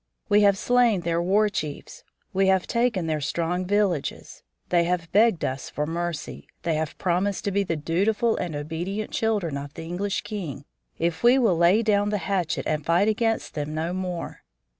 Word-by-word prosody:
We 205 Hz, 0 st, +5 dB
have 200 Hz, -1 st, +5 dB
slain 240 Hz, -4 st, +3 dB
their 170 Hz, 0 st, 0 dB
war 200 Hz, +5 st, +3 dB
chiefs; 150 Hz, -8 st, -5 dB, 0.3 s
we 195 Hz, 0 st, +2 dB
have 190 Hz, -1 st, +3 dB
taken 235 Hz, -7 st, 0 dB
their 155 Hz, -2 st, -1 dB
strong 170 Hz, +4 st, -1 dB
villages. 200 Hz, -7 st, -1 dB, 0.3 s
They 170 Hz, -1 st, +3 dB
have 170 Hz, -2 st, -2 dB
begged 215 Hz, -5 st, +3 dB
us 130 Hz, +1 st, -4 dB
for 150 Hz, -, -2 dB
mercy. 165 Hz, -1 st, -4 dB, 0.2 s
They 170 Hz, -, 0 dB
have 155 Hz, -1 st, -2 dB
promised 185 Hz, +2 st, 0 dB
to 200 Hz, -, 0 dB
be 200 Hz, +1 st, +1 dB
the 170 Hz, -3 st, -2 dB
dutiful 200 Hz, +9 st, +1 dB
and 175 Hz, -4 st, -3 dB
obedient 170 Hz, +8 st, -4 dB
children 205 Hz, -10 st, 0 dB
of 140 Hz, +1 st, -8 dB
the -, -, -7 dB
English 190 Hz, +4 st, -2 dB
king 205 Hz, -, -6 dB, 0.3 s
if 170 Hz, 0 st, -1 dB
we 240 Hz, +2 st, +6 dB
will 230 Hz, -9 st, +3 dB
lay 175 Hz, +7 st, +4 dB
down 205 Hz, -1 st, +2 dB
the 210 Hz, -, 0 dB
hatchet 185 Hz, -2 st, -1 dB
and 155 Hz, -1 st, -1 dB
fight 175 Hz, +7 st, +3 dB
against 225 Hz, +1 st, 0 dB
them 150 Hz, 0 st, -4 dB
no 165 Hz, +3 st, -2 dB
more. 180 Hz, -2 st, -4 dB
180 Hz, 185 wpm, -25 LUFS, 165-205 Hz, 0.3 s, we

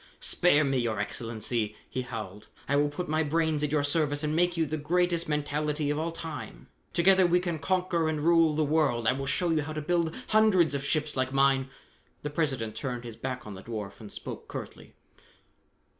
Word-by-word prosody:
"Spare 165 Hz, -4 st, +3 dB
me, 135 Hz, -2 st, +1 dB
Your 115 Hz, -3 st, -1 dB
Excellency," 110 Hz, 0 st, -2 dB
he 130 Hz, -, -3 dB
howled. 110 Hz, -4 st, -7 dB, 0.2 s
"I 140 Hz, -, +1 dB
will 145 Hz, +1 st, +3 dB
put 175 Hz, +5 st, -4 dB
my 155 Hz, +1 st, +1 dB
brains 160 Hz, 0 st, +1 dB
at 150 Hz, -, 0 dB
your 150 Hz, -2 st, +2 dB
service 145 Hz, 0 st, 0 dB
and 150 Hz, 0 st, 0 dB
make 175 Hz, +1 st, +2 dB
you 165 Hz, -, +2 dB
the 155 Hz, +1 st, -3 dB
greatest 170 Hz, +2 st, +1 dB
mentality 150 Hz, 0 st, -1 dB
of 150 Hz, -, -1 dB
all 165 Hz, +1 st, -1 dB
time. 165 Hz, -2 st, -8 dB, 0.2 s
Together 185 Hz, +1 st, +5 dB
we 175 Hz, +1 st, +4 dB
can 175 Hz, -3 st, -2 dB
conquer 180 Hz, -2 st, +1 dB
and 155 Hz, -1 st, -1 dB
rule 165 Hz, -1 st, +4 dB
the 155 Hz, -, +2 dB
world. 145 Hz, -6 st, +1 dB
I -, -, +5 dB
will 135 Hz, +1 st, -4 dB
show 170 Hz, +5 st, +1 dB
you 160 Hz, -1 st, +2 dB
how 155 Hz, +1 st, -5 dB
to 155 Hz, -, -3 dB
build 165 Hz, +1 st, 0 dB
hundreds 210 Hz, -7 st, +4 dB
of 140 Hz, -1 st, -2 dB
ships 150 Hz, +1 st, 0 dB
like 130 Hz, 0 st, 0 dB
mine 135 Hz, -1 st, +3 dB, 0.3 s
" -, -, -37 dB
The 150 Hz, -, -3 dB
President 135 Hz, -8 st, -1 dB
turned 125 Hz, 0 st, -4 dB
his 115 Hz, -2 st, -7 dB
back 130 Hz, +1 st, -5 dB
on 105 Hz, -, -7 dB
the 95 Hz, -, -9 dB
dwarf 105 Hz, -3 st, -6 dB
and 105 Hz, -2 st, -10 dB
spoke -, -, -7 dB
curtly. -, -, -8 dB
150 Hz, 205 wpm, -28 LUFS, 130-165 Hz, 0.3 s, Together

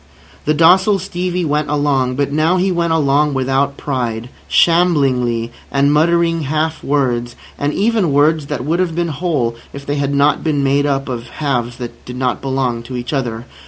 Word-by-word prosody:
The 155 Hz, -, +2 dB
docile 185 Hz, +6 st, +5 dB
Stevie 180 Hz, -1 st, -3 dB
went 150 Hz, 0 st, -1 dB
along; 140 Hz, -4 st, +1 dB
but 140 Hz, +1 st, -1 dB
now 155 Hz, +5 st, +2 dB
he 185 Hz, +1 st, +1 dB
went 170 Hz, -1 st, 0 dB
along 145 Hz, -2 st, +2 dB
without 135 Hz, +1 st, 0 dB
pride, 120 Hz, -4 st, -3 dB, 0.2 s
shamblingly, 135 Hz, -9 st, +2 dB, 0.2 s
and 140 Hz, +1 st, +2 dB
muttering 165 Hz, +1 st, +2 dB
half 155 Hz, +2 st, -2 dB
words, 120 Hz, -4 st, 0 dB, 0.2 s
and 145 Hz, +1 st, -1 dB
even 210 Hz, -3 st, +1 dB
words 150 Hz, +1 st, +2 dB
that 135 Hz, -4 st, -4 dB
would 165 Hz, +4 st, 0 dB
have 175 Hz, -3 st, 0 dB
been 170 Hz, 0 st, -1 dB
whole 145 Hz, -7 st, -1 dB, 0.2 s
if 140 Hz, 0 st, -8 dB
they 145 Hz, +1 st, -2 dB
had 140 Hz, 0 st, -1 dB
not 140 Hz, +1 st, +2 dB
been 150 Hz, -3 st, 0 dB
made 140 Hz, +1 st, +2 dB
up 135 Hz, -1 st, -1 dB
of 120 Hz, -2 st, -5 dB
halves 120 Hz, -4 st, -2 dB
that 120 Hz, -2 st, -8 dB
did 125 Hz, -, -8 dB
not 125 Hz, -1 st, -1 dB
belong 130 Hz, -3 st, -1 dB
to 125 Hz, +2 st, -7 dB
each 120 Hz, +4 st, -5 dB
other. 120 Hz, -4 st, -3 dB
145 Hz, 180 wpm, -17 LUFS, 130-160 Hz, 0.2 s, docile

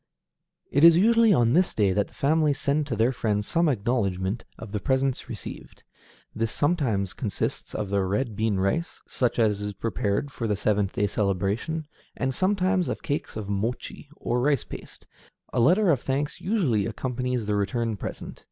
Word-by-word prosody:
It 145 Hz, -, +2 dB
is 170 Hz, 0 st, +9 dB
usually 225 Hz, +3 st, +5 dB
on 120 Hz, -, +4 dB
this 180 Hz, +3 st, +2 dB
day 100 Hz, -3 st, +3 dB
that 100 Hz, +1 st, +1 dB
the -, -, -23 dB
family 150 Hz, +1 st, +2 dB
send 145 Hz, +2 st, 0 dB
to 125 Hz, -, -2 dB
their 115 Hz, +4 st, +3 dB
friends 105 Hz, -4 st, -1 dB
some 170 Hz, -1 st, +2 dB
acknowledgment 100 Hz, -4 st, -1 dB
of 110 Hz, -3 st, -9 dB
the 105 Hz, -, -2 dB
presents 130 Hz, +1 st, 0 dB
received. 110 Hz, -4 st, -8 dB, 0.5 s
This 115 Hz, +1 st, -1 dB
sometimes 130 Hz, -, 0 dB
consists -, -, -3 dB
of 105 Hz, -2 st, -3 dB
the 100 Hz, -1 st, +2 dB
red 105 Hz, +4 st, -1 dB
bean 110 Hz, 0 st, 0 dB
rice, 100 Hz, -, -1 dB
such 125 Hz, -2 st, -1 dB
as 105 Hz, -3 st, +2 dB
is 105 Hz, 0 st, -3 dB
prepared 110 Hz, +4 st, -2 dB
for 115 Hz, -5 st, -3 dB
the 105 Hz, -, +1 dB
seventh 100 Hz, -1 st, 0 dB
day 105 Hz, -, +1 dB
celebration, 100 Hz, -, -1 dB, 0.3 s
and 130 Hz, 0 st, -1 dB
sometimes 185 Hz, +1 st, +1 dB
of -, -, -4 dB
cakes 145 Hz, 0 st, -3 dB
of 105 Hz, -2 st, -5 dB
mochi, 110 Hz, +7 st, -3 dB
or 120 Hz, -4 st, -1 dB
rice 140 Hz, -1 st, +2 dB
paste. -, -, -10 dB, 0.5 s
A -, -, +1 dB
letter 180 Hz, -, +4 dB
of 135 Hz, -6 st, +1 dB
thanks 140 Hz, +2 st, -2 dB
usually 150 Hz, -, +1 dB
accompanies 125 Hz, -2 st, -2 dB
the 105 Hz, -, -1 dB
return 110 Hz, +2 st, 0 dB
present. -, -, -7 dB
120 Hz, 175 wpm, -26 LUFS, 105-145 Hz, 0.5 s, is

